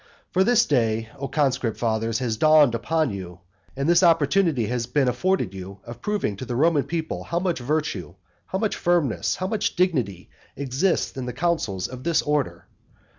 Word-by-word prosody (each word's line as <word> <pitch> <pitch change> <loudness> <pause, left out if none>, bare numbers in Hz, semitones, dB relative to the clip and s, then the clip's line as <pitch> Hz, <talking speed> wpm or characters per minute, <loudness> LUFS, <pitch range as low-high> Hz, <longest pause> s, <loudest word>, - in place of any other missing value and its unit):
For 185 - +3
this 240 +2 +4
day, 115 -4 +1
O 140 - -3
conscript 130 -6 0
fathers, 115 -1 0
has 120 -4 -1
dawned 155 0 +5
upon 155 +4 0
you, 90 -3 -8 0.4
and 140 +2 -1
this 170 +1 +5
opportunity 165 - +3
has 120 +1 -2
been 135 +1 +1
afforded 125 - 0
you 95 +1 -8
of 120 0 -10
proving 205 - -1
to 130 - -6
the 120 - -4
Roman 150 +1 +3
people 160 -1 -4
how 170 - -2
much 175 -3 0
virtue, 125 - -2 0.3
how 190 - -2
much 215 +1 -1
firmness 170 -8 +1
and - - -13
how 185 - 0
much 215 +1 -1
dignity 130 - 0 0.2
exists 140 +7 0
in 130 -1 -4
the 125 - -4
counsels 135 - -1
of 130 0 -9
this 170 -2 +2
order. 150 -2 -1
140 Hz, 180 wpm, -24 LUFS, 115-170 Hz, 0.4 s, dawned